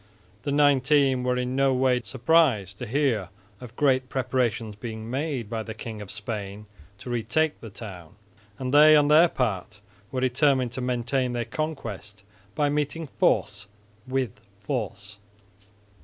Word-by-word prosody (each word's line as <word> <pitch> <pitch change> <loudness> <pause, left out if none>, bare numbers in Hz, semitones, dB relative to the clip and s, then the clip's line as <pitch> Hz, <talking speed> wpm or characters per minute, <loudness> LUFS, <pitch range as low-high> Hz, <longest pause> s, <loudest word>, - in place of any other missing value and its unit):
The 140 - -3
Nineteen 140 -2 +3
were 125 0 0
in 125 +1 -2
no 135 -1 +3
way 125 -1 +2
surprised 120 - +2
to 125 - -5
hear 120 -7 0 0.3
of 125 -3 -11
great 130 -3 +2
preparations 120 -5 -1
being 110 +1 -7
made 135 -4 -2
by 115 0 -3
the 110 0 -7
King 110 -1 -7
of 100 - -9
Spain 105 0 -6 0.3
to 120 +5 -8
retake 125 +7 0
the 115 - -8
town, 95 -5 -10 0.4
and 130 0 -4
they 155 +1 +8
on 145 -1 +4
their 160 +3 +7
part 105 - -2 0.3
were 130 - -2
determined 130 -1 +2
to 130 - -4
maintain 125 +1 -1
their 120 -1 -2
conquest 105 -11 -5 0.3
by 145 - +2
meeting 150 +2 -1
force 105 0 +1 0.4
with 130 -6 -2 0.2
force. 100 0 -5
125 Hz, 145 wpm, -26 LUFS, 110-140 Hz, 0.4 s, they